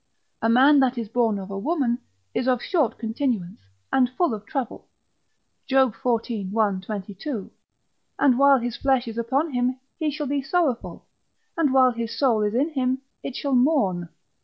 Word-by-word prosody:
A 225 - +2
man 270 +5 +6
that 260 -2 +2
is 230 -3 -4
born 225 -3 +1
of 195 0 -7
a 195 - -4
woman 255 - 0 0.3
is 255 - -1
of 255 -2 +3
short 315 - 0
continuance, 225 -5 -2 0.3
and 255 -2 +4
full 255 +2 0
of 210 -1 -7
trouble, 265 -2 -4 0.8
Job 265 -3 +3
xiv. 225 -4 -2
1, 205 -2 +1
22. 205 - -6 0.7
And 255 -3 +3
while 280 0 +6
his 240 -1 -3
flesh 265 -3 +1
is 230 0 -4
upon 270 +6 0
him 250 +1 0 0.2
he 315 -2 0
shall 295 +1 -4
be 280 0 -1
sorrowful, 280 -3 -1 0.5
and 320 -5 +2
while 260 -1 +5
his 235 -1 -5
soul 240 -6 +2
is 210 +1 0
in 280 +6 +2
him 260 -3 -1 0.2
it 260 - -6
shall 280 -2 -2
mourn. 245 - +2
250 Hz, 170 wpm, -24 LUFS, 225-275 Hz, 0.8 s, man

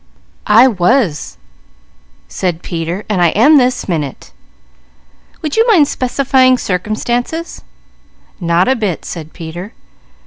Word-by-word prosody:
"I 225 +5 +6
was," 180 - 0 0.9
said 175 -3 -3
Peter; 170 +3 -4
"I 180 -5 +2
am 285 +8 +6
this 250 0 0
minute." 155 -7 -4 1.1
"Would 305 +4 -3
you 450 +2 +4
mind 350 -11 +5
specifying 255 0 +2
circumstances?" 240 - -3 0.8
"Not 170 0 +1
a 260 - +3
bit," 210 -8 -3
said 160 -2 -7
Peter. 175 +6 -8
210 Hz, 105 wpm, -14 LUFS, 175-260 Hz, 1.1 s, I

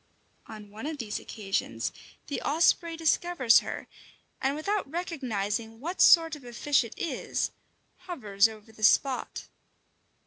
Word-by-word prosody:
On 210 -2 -11
one 220 +7 -7
of 310 -1 -4
these 220 -6 -4
occasions 200 -1 -3 0.3
the 285 - -4
osprey 330 +2 +2
discovers 325 -6 +4
her, - - -6 0.6
and 270 +1 +1
without 395 +2 -2
recognizing 230 - -3
what 340 +8 -3
sort 325 -2 +7
of 290 - -13
a 240 -1 -10
fish 285 +2 +2
it 230 - -9
is, 335 - -2 0.6
hovers 215 - +2
above 220 0 -13
the - - -13
spot. 260 +4 +2
265 Hz, 135 wpm, -28 LUFS, 220-325 Hz, 0.6 s, sort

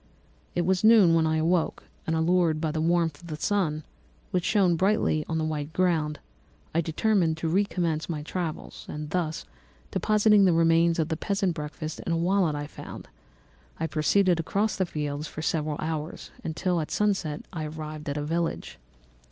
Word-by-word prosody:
"It 175 - +1
was 190 +2 +1
noon 215 -6 +7
when 165 -1 +3
I 160 0 +1
awoke, 165 +1 +1 0.2
and 160 - +1
allured 165 -1 +2
by 155 -1 -1
the 155 0 -2
warmth 165 -2 +1
of 170 - -12
the 155 - -4
sun, 155 -3 0 0.5
which 180 -1 0
shone 190 -4 +3
brightly 190 -4 +2
on 160 - 0
the 160 - 0
white 155 -1 -3
ground, 160 -5 +1 0.6
I 165 - +2
determined 170 0 +1
to 165 - -2
recommence 170 -3 0
my 150 -3 -3
travels; 165 -1 -5
and, 150 0 -6 0.8
depositing 210 -1 +4
the 180 - +4
remains 165 0 +4
of 160 -1 0
the 160 - -1
peasant's 195 0 0
breakfast 155 0 -6
in - - -4
a 165 - +2
wallet 175 -2 +2
I 145 0 -3
found, 145 - -10 0.7
I 160 - 0
proceeded 170 +3 +2
across 200 +5 0
the 185 -2 0
fields 150 -1 -3
for 155 - -7
several 155 -2 -1
hours, 155 0 -4
until 170 +2 -1
at 155 - -5
sunset 190 -8 0
I 160 -3 -3
arrived 155 -1 -6
at 140 - -2
a 145 - -2
village. 165 +2 -2
165 Hz, 175 wpm, -27 LUFS, 155-180 Hz, 0.8 s, noon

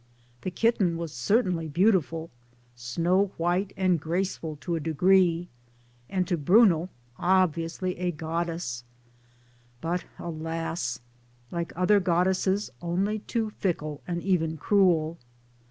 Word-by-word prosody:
The - - -2
kitten 190 -4 +1
was 165 -3 -5
certainly 175 - +1
beau 180 +9 +4
tiful 165 -3 -1 0.4
snow 170 +11 0
white 180 +4 0
and 185 -3 +2
graceful 165 -1 -2
to 175 - -3
a - - -1
degree 175 +2 +3 0.6
and 185 -2 0
to 175 - 0
Bruno 180 +1 +4 0.3
obviously 180 0 +1
a 180 0 0
goddess; 165 -5 -3 1.0
but 170 +5 -2
alas 165 -5 -3 0.5
1 170 - -3
like 170 - -4
other 185 +4 +4
goddesses 190 +1 +1
only 195 +5 0
too 220 0 -2
fickle 155 -6 -2
and* 170 -1 -3
even 165 -4 +1
cruel. 170 -3 +2
175 Hz, 120 wpm, -27 LUFS, 165-190 Hz, 1.0 s, beau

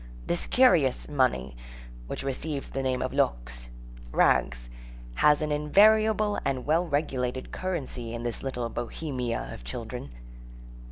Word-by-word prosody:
This 175 - -1
curious 170 - +4
money, 125 - 0 0.5
which - - -5
receives 140 +1 -3
the 135 - -2
name 130 -1 0
of - - -3
loques—rags—has - - -1
an 150 - -2
invariable 210 +7 +4
and 135 -2 -2
well 165 +4 +2
regulated 130 -4 -2
currency 140 -10 -4
in 120 0 -5
this 120 -2 -3
little 125 -3 -3
Bohemia 125 0 -3
of - - -10
children. 60 +3 -6
130 Hz, 115 wpm, -27 LUFS, -, 0.5 s, curious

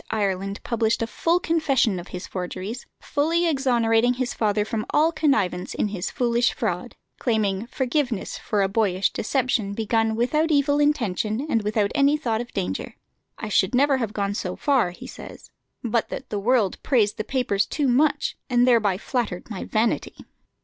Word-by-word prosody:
Ireland 195 -2 -2
published 230 -1 0
a - - +1
full 335 +9 +1
confession 275 - +1
of 175 - -9
his 180 - -7
forgeries, 190 +6 -5
fully 330 +4 +1
exonerating 245 -5 +2
his 250 -1 -2
father 210 -1 +1
from 220 -1 -2
all 315 +2 +3
connivance 245 - 0
in 210 - 0
his 195 -2 -3
foolish 240 -1 +1
fraud, - - -3 0.2
claiming 215 -3 0
forgiveness 255 -3 -1
for 205 -2 -1
a - - +2
boyish 195 -2 +1
deception 235 -4 0
begun 225 0 +1
without 300 +8 +1
evil 285 -1 +3
intention 235 -5 0
and 230 -7 +1
without 210 -1 0
any 285 +1 +3
thought 230 -6 -1
of 240 - -8
danger. 95 +1 -3 0.4
"I 215 - -5
should 195 +3 +2
never 275 +1 +4
have 230 -5 -2
gone 200 -1 -2
so 185 -3 -3
far," 270 - +2
he 175 - -11
says, - - -11 0.3
"but 230 -1 0
that - - -7
the 205 - -1
world 220 -2 +1
praised 220 -5 +2
the 215 - -2
papers 220 -5 0
too 290 -3 -1
much, 290 +4 +2
and 245 -1 +4
thereby 215 -6 +3
flattered 225 -3 -3
my 195 - -5
vanity." 220 +1 0
230 Hz, 170 wpm, -24 LUFS, 205-265 Hz, 0.4 s, never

